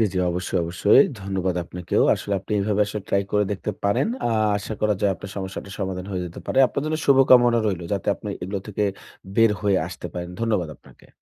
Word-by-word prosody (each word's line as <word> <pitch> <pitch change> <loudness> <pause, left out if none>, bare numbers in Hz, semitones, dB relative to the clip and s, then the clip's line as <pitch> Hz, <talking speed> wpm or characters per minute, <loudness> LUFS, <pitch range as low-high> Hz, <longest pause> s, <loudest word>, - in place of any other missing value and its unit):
জি, - - +5
জি, 95 - -1
অবশ্যই, 90 +1 -2
অবশ্যই। 90 +9 +5 0.2
ধন্যবাদ 95 -2 -2
আপনাকেও। 90 0 -1
আসলে 100 - -5
আপনি 100 - -7
এভাবে 105 +1 0
আসলে 105 -1 -5
ট্রাই 100 0 +2
করে 105 0 +3
দেখতে 100 +2 -3
পারেন। 100 - +2 0.2
আ - - 0 0.3
আশা 110 +2 -5
করা 105 -1 +2
যায় 100 -2 +2
আপনার 95 +2 -9
সমস্যাটার 95 0 -6
সমাধান 95 -1 -3
হয়ে 90 -2 -2
যেতে 85 - -9
পারে। 130 - 0
আপনার 140 - -3
জন্য 155 0 0
শুভকামনা 125 -3 +6
রইলো 90 -4 -2
যাতে 100 -3 -2
আপনি - - -8
এগুলা 95 +2 -3
থেকে 105 0 -1 0.5
বের 115 -1 +6
হয়ে 100 -2 +2
আসতে - - -7
পারেন। 85 0 -5
ধন্যবাদ 105 -7 0
আপনাকে। - - -20
100 Hz, 205 wpm, -23 LUFS, 95-105 Hz, 0.5 s, শুভকামনা